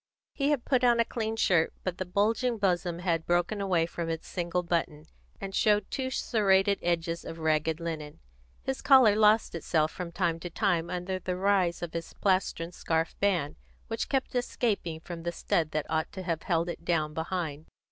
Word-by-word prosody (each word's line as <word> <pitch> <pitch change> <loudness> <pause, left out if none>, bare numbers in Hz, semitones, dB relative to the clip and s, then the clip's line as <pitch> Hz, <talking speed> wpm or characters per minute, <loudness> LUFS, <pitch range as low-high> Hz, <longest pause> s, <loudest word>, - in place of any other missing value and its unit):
He 280 0 0
had 290 -5 0
put 255 -2 +2
on 240 -1 +4
a 230 - +4
clean 225 -1 -3
shirt, 180 -7 +2
but 180 -1 -3
the 185 - -3
bulging 225 +6 +1
bosom 180 -3 0
had 170 -2 0
broken 175 +4 +1
away 180 -4 +2
from 170 0 -4
its 165 0 -4
single 175 0 -2
button, 165 -3 -2 0.3
and 195 -1 -6
showed 210 -1 +2
two 260 -1 -2
serrated 200 -5 +2
edges 170 -1 -1
of 165 - -7
ragged 160 0 +1
linen; 155 -3 -5 0.5
his 265 0 -3
collar 260 -7 +6
lost 215 +1 +4
itself 155 -1 0
from 180 -2 -6
time 165 -1 0
to 175 - -6
time 175 -3 0
under 180 +1 -3
the 180 0 -3
rise 190 -3 +2
of 170 - -5
his 165 0 -5
plastron 185 -3 0
scarf 165 -1 -1
band, 180 -8 +1 0.3
which 225 - -3
kept 270 -2 -1
escaping 220 -9 -1
from 170 0 -7
the 170 +1 -2
stud 165 -1 0
that 155 -1 -2
ought 160 0 -1
to 190 - -6
have 170 -3 -2
held 170 -1 0
it 170 - -6
down 155 -3 0
behind. 160 -2 -3
175 Hz, 190 wpm, -29 LUFS, 165-205 Hz, 0.5 s, collar